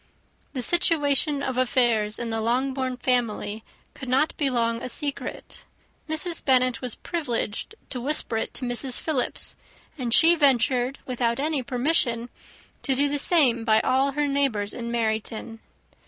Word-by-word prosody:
The 255 -3 -2
situation 295 -2 +2
of 260 -2 -2
affairs 235 -4 +2
in 235 -1 -4
the 225 0 -1
Longbourn 260 +2 -1
family 230 -4 -1 0.3
could 265 -3 -8
not 275 +5 +2
be 285 -3 +1
long 230 -2 0
a 255 - -5
secret. 285 +2 -4 0.5
Mrs. 320 +2 +1
Bennet 255 -2 +3
was 250 -3 -2
privileged 280 - -3 0.2
to 250 - -3
whisper 265 -4 0
it - - -2
to 260 - -2
Mrs. 245 +1 -1
Philips, 290 -6 -2 0.4
and 245 -2 -2
she 330 +7 +7
ventured, 265 -3 +2
without 240 -1 -1
any 300 -1 0
permission, 245 -2 0 0.5
to 270 - 0
do 285 +2 +2
the 290 0 -1
same 270 -8 +4
by 220 -1 +4
all 270 +2 +1
her 295 +1 0
neighbours 270 -8 0
in 235 -1 -5
Meryton. 225 -1 -3
255 Hz, 150 wpm, -25 LUFS, 235-280 Hz, 0.5 s, she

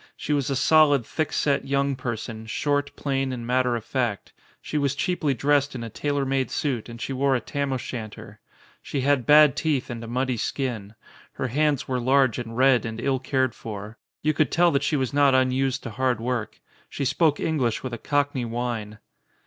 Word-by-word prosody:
She 150 - -2
was 140 -2 0
a 135 - 0
solid, 145 -3 +4
thick 155 +5 -2
set, 140 -1 0
young 140 0 +1
person, 110 -3 -5
short, 145 +4 -1
plain, 135 -2 -1
and 120 -2 -5
matter 125 0 +1
of 115 - -5
fact. 120 -7 -2 0.3
She - - -8
was 140 -1 0
cheaply 155 -3 0
dressed 145 +2 +1
in 120 - -5
a 115 - -7
tailor 145 +3 -1
made 135 -1 0
suit 125 -6 -2
and 115 0 -9
she 135 - -4
wore 135 +1 +2
a - - +1
Tam 140 +4 -3
o' 130 - 0
shanter. 110 -4 -8 0.4
She 140 - -3
had 135 -2 +1
bad 150 -2 +7
teeth 145 -6 -1
and 115 -1 -6
a - - -7
muddy 125 +1 -1
skin. 110 -5 -3 0.4
Her 130 - -3
hands 145 +1 +1
were 130 -1 -1
large 130 -1 +3
and 115 -1 -6
red 130 -1 +4
and 110 -1 -5
ill 130 +1 0
cared 130 -2 0
for. 105 0 -8 0.2
You 155 +1 +2
could 150 +1 +1
tell 175 0 +4
that 140 - +1
she 140 - 0
was 130 -1 -2
not 140 -2 +4
unused 130 +1 +1
to 120 - -6
hard 125 0 0
work. 120 -1 -3 0.3
She 140 - -4
•spoke 150 +2 +2
English 135 -8 0
with 130 -2 -5
a 120 - -5
Cockney 145 -3 0
whine. 115 -3 -4
130 Hz, 205 wpm, -25 LUFS, 120-140 Hz, 0.4 s, bad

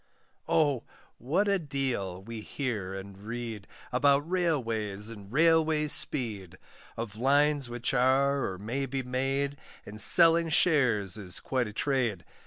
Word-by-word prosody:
Oh! 145 -6 +2 0.4
what 170 - 0
a 200 -1 +2
deal 130 - -3
we 115 +1 -8
hear 105 -7 -4
and 95 0 -9
read, 115 -2 -6 0.2
About 140 +3 +2
Railways 115 - -1
and 100 -2 -12
Railway 160 +1 +3
speed! 105 - -1 0.4
Of 110 -2 -6
lines 140 +1 +2
which 120 +1 -3
are, 135 +2 +2
or 95 - -7
may 120 +8 -4
be 135 0 -3
made, 135 +3 -2 0.3
And 105 +1 -2
selling 165 - +6
shares 120 - +2
is 90 -3 +1
quite 130 -3 -2
a 105 - -9
trade. 120 - -1
125 Hz, 135 wpm, -28 LUFS, 105-145 Hz, 0.4 s, selling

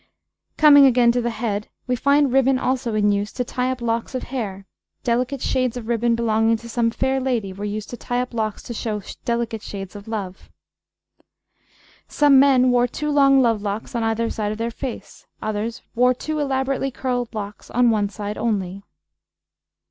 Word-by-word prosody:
Coming 285 -2 +8
again 240 -2 +4
to 245 +1 0
the 240 - -1
head, 215 -2 -3 0.2
we 250 - 0
find 280 +1 +3
ribbon 270 0 +4
also 250 -3 -1
in 210 -1 +3
use 205 +1 -1
to 250 - -2
tie 250 +1 -2
up 255 -2 -5
locks 230 +3 -2
of 255 - -3
hair; 200 -7 -5 0.4
delicate 250 +2 -1
shades 255 -2 0
of 230 -2 -7
ribbon 235 0 +1
belonging 225 0 +2
to 235 - -11
some 235 0 +1
fair 265 +3 0
lady 240 -7 -1
were 200 +2 -6
used 210 0 -5
to 245 - -6
tie 245 +1 -2
up 250 0 -3
locks 220 -2 -2
to 235 - -6
show 215 -3 -3 0.2
delicate 235 -2 -1
shades 195 -2 -7
of 205 +1 -10
love. 200 -4 -6 1.6
Some 290 -2 +5
men 260 -2 +5
wore 245 0 +3
two 300 +5 -3
long 275 -2 +5
love 225 -3 +2
locks 205 +4 -4
on 235 - -1
either 225 +1 0
side 210 -1 -2
of 215 - -4
the 230 +1 -2
face, 250 +1 -8
others 215 +2 -3
wore 250 +1 +3
two 310 +4 -4
elaborately 270 -1 0
curled 245 -2 -3
locks 205 -1 -7
on 245 -1 +3
one 205 -2 +1
side 205 0 -6
only. 200 -4 -2
235 Hz, 185 wpm, -22 LUFS, 215-255 Hz, 1.6 s, Coming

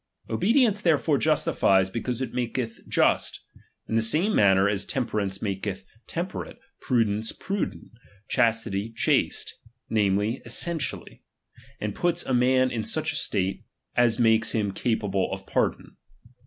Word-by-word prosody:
Obedience 210 - +3
therefore 155 -5 +2
justifies, 95 -11 +2
be 115 - -3
cause 125 0 -3
it - - -6
mdketh 120 -1 -3
just; - - +2 0.5
in - - -5
the 115 - +3
same 160 - +2
manner 95 -1 +5
as 100 -1 0
temperance 105 -7 -2
maketh 95 -1 -3 0.2
temperate, 175 +3 -5 0.2
prudence 110 -3 0
prudent, 200 +1 -4 0.4
chastity 115 -2 0
chaste; - - 0 0.3
namely, 105 +2 +1
essentially; 170 -3 -3 0.6
and 105 -1 -3
puts 175 - 0
a 130 - -1
man 130 +1 +3
in 115 -2 -2
such - - 0
a - - -4
state, 95 0 -1 0.3
as 120 -2 +3
makes 115 -1 +3
him 105 -3 0
capable 100 -3 -1
of 95 0 -6
par - - +2
don. - - -16
115 Hz, 135 wpm, -26 LUFS, 100-130 Hz, 0.6 s, manner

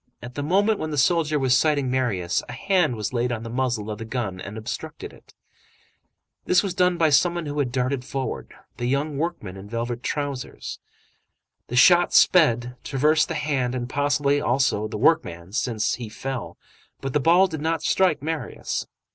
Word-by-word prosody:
At 125 0 -9
the 145 - -4
moment 200 +8 +2
when 155 - -3
the 150 - -3
soldier 155 +2 +2
was 130 -3 +3
sighting 145 -1 +2
Marius, 100 -10 0
a - - -6
hand 185 -9 +1
was 105 +2 -4
laid 120 0 0
on 115 -2 -3
the 115 - -7
muzzle 120 -4 -1
of 105 - -6
the - - -5
gun 110 -6 -4
and 105 +3 -7
obstructed 110 - -6
it. - - -20 1.1
This 180 - +4
was 195 -3 -2
done 180 -1 +2
by 160 -2 +3
some 170 +5 +4
one 170 -2 -3
who 145 0 -3
had 130 -4 0
darted 130 +1 -1
forward,—the 125 - -5
young 140 +2 -1
workman 130 - -4
in 100 +2 -10
velvet 120 +1 -3
trousers. 140 -2 -4 0.9
The 125 - -5
shot 175 +7 +6
sped, 125 -8 +4
traversed 150 +3 +2
the 165 - -4
hand 135 -5 -1
and 120 -1 -3
possibly, 145 +1 +1
also, 120 -6 +1
the 105 - -5
workman, 95 - +1
since 110 -1 0
he 120 -3 -5
fell, 130 +3 -5 0.4
but 135 -1 -4
the 150 - +3
ball 170 +6 +5
did 160 -5 -5
not 160 0 -1
strike 175 -7 +2
Marius. 155 -5 -3
135 Hz, 180 wpm, -24 LUFS, 120-155 Hz, 1.1 s, shot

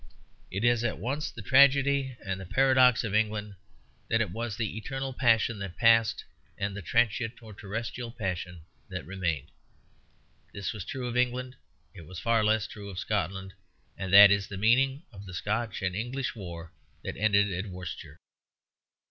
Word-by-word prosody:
It 95 +4 -4
is 120 -1 +3
at 120 - -1
once 140 +5 -3
the 110 - -10
tragedy 140 +1 +4
and 95 -1 -3
the - - -7
paradox 130 0 +4
of 110 -4 -3
England 105 -1 0 0.6
that - - +2
it - - -1
was 115 0 -4
the 110 -3 -2
eternal 135 +4 -4
passion 115 -3 +2
that 100 -3 -6
passed, 115 -1 +4 0.3
and 100 -1 -3
the 100 - -5
transient 115 +4 +1
or 110 -1 -11
terrestrial 115 +4 -5
passion 90 -5 -4 0.3
that - - -6
remained. 85 -7 -3 1.0
This 100 -2 -4
was 100 -4 -7
true 130 -1 -5
of 120 - -4
England; 125 +1 0 0.4
it 85 -6 -12
was 90 0 -8
far 115 -2 +2
less 110 -1 +2
true 100 -1 -9
of 95 - -9
Scotland; 95 -1 -2 0.4
and 95 -1 -5
that 100 +1 +10
is 100 -1 +2
the 100 - -7
meaning 130 - +3
of 100 -2 -11
the 90 - -8
Scotch 105 +2 -2
and 90 -1 -1
English 120 +5 -3
war 85 -5 -8 0.3
that - - -5
ended 105 -1 +3
at 95 +4 -4
Worcester. 90 -4 -8
110 Hz, 170 wpm, -28 LUFS, 95-120 Hz, 1.0 s, that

